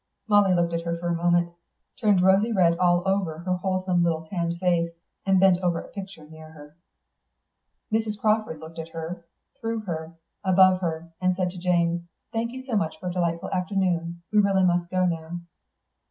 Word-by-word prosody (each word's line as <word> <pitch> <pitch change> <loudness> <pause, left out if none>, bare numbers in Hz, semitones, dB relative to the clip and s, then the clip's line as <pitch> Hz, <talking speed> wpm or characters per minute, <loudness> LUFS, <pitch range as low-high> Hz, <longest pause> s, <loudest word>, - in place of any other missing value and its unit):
Molly 205 -2 +5
looked 170 -1 +1
at 165 - -1
her 170 0 -2
for 175 +1 -3
a - - +1
moment, 175 0 +2
and 170 - -28 0.4
turned 205 -6 +3
rosy 195 +5 +4
red 175 -5 +4
all 175 -1 +3
over 190 -5 0
her 180 +2 -2
wholesome 185 -1 0
little 165 -1 0
tanned 170 0 -2
face, 170 -2 +1 0.4
and 190 -1 +4
bent 190 -1 +5
over 175 -2 0
a - - -10
picture 190 -6 -9
near 160 0 -12
her. 150 -1 -14 1.2
Mrs. 220 -1 0
Crawford 215 -5 +1
looked 160 +1 -10
at 160 0 -6
her, 165 +2 -6 0.4
through 225 0 -2
her, 165 -4 -5 0.3
above 185 -1 +5
her, 165 -1 -3
and 185 0 +2
said 180 -1 -1
to 180 - -9
Jane, 170 -1 +1 0.3
"Thank 230 +1 -1
you 260 +1 -8
so 250 -4 -2
much 160 -5 -1
for 180 - -4
a - - -4
delightful 170 -1 -1
afternoon. 180 -3 -1
We 210 - +5
really 195 -2 +3
must 175 -1 +2
go 185 0 +1
now." 170 0 -3
175 Hz, 190 wpm, -25 LUFS, 170-190 Hz, 1.2 s, Molly